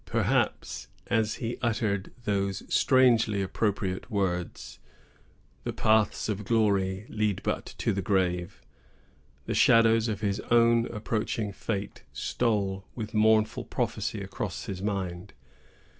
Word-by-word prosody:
Perhaps, - - 0 0.2
as 110 -2 +2
he 120 0 -4
uttered 110 -5 -1
those 100 -2 -1
strangely 115 -6 +4
appropriate 95 0 -2
words,—— 95 -5 -2 0.8
"The - - -3
paths 110 -1 +2
of 105 -1 -2
glory 100 -3 +1
lead 105 -3 -1
but - - -2
to - - 0
the 100 - -1
grave," 90 -2 -1 0.8
the - - -2
shadows 115 0 +5
of 105 -2 -3
his 100 -1 0
own 115 0 +4
approaching 105 -1 -2
fate 100 -1 -4
stole 100 -5 -1
with 110 -3 -5
mournful 110 0 +3
prophecy - - -2
across - - -5
his 95 -1 -5
mind. 95 -3 -3
105 Hz, 115 wpm, -28 LUFS, 95-115 Hz, 0.8 s, shadows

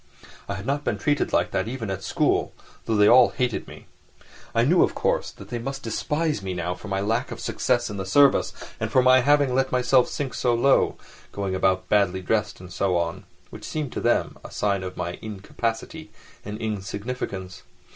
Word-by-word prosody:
I 100 - -2
had 100 +1 -7
not 140 +2 -1
been - - -1
treated 145 -1 0
like - - +1
that - - -1
even 115 -4 -4
at 95 - -4
school, - - +1 0.3
though 115 - 0
they 105 0 +5
all 125 +3 +7
hated 125 -2 -2
me. - - -12 0.7
I 115 - +4
knew, 170 +8 +4
of - - +2
course, - - 0
that - - -13
they 120 - -3
must 135 +3 -5
despise 150 +4 -1
me 95 -1 -4
now 90 0 -2
for 90 - -11
my 95 -1 -1
lack 115 +5 0
of - - -7
success 120 -1 0
in 105 - -6
the 95 - -4
service, 140 +7 +4 0.3
and - - -2
for 130 - +4
my 130 0 +6
having 145 -1 +3
let 135 +1 +1
myself 125 0 +3
sink 140 -3 -4
so 120 -2 +1
low, 135 +4 +3 0.3
going 100 -2 -3
about 95 0 +1
badly 95 -2 +2
dressed 105 +2 -1
and 90 -1 -11
so 90 0 +1
on—which 85 -1 -6
seemed 150 -5 -4
to - - -4
them 120 - +1
a - - -9
sign 100 -2 0
of 90 -1 -6
my 90 0 -4
incapacity 115 +8 -4 0.3
and 105 +1 -6
insignificance. 100 -2 -5
110 Hz, 195 wpm, -24 LUFS, 95-130 Hz, 0.7 s, all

